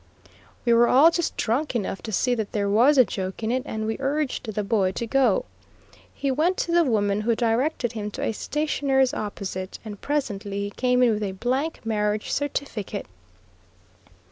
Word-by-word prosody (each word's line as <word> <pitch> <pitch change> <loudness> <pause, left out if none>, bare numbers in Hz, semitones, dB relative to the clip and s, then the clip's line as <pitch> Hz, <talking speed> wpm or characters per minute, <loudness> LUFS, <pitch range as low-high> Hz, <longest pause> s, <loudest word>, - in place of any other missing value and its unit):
We 235 - +4
were 235 +1 +5
all 295 +6 +6
just 345 -1 -2
drunk 250 +5 0
enough 200 -3 -2
to 220 - -6
see 250 +5 +1
that 220 -4 -3
there 205 -2 0
was 240 +9 +4
a 255 - +7
joke 190 +1 -5
in 220 - 0
it, 255 +1 +1
and 220 0 -3
we 220 0 -2
urged 275 -4 -1
the 210 0 -2
boy 195 -2 +1
to 235 - -3
go. 245 -3 +2 0.7
He 275 -1 -2
went 325 +7 +1
to 340 - -1
the 340 0 +5
woman, 210 -6 +1
who 230 +1 +1
directed 240 +2 0
him 210 -3 -4
to - - -4
a - - +1
stationer's 270 0 0
opposite, 195 -2 -5
and 205 -2 -8
presently 205 -9 -2
he 200 - -3
came 250 +2 +2
in 240 - +5
with 215 -1 -1
a 195 -2 -2
blank 260 - -2
marriage 210 -1 -1
certificate. 280 -7 -3
230 Hz, 185 wpm, -24 LUFS, 210-270 Hz, 0.7 s, a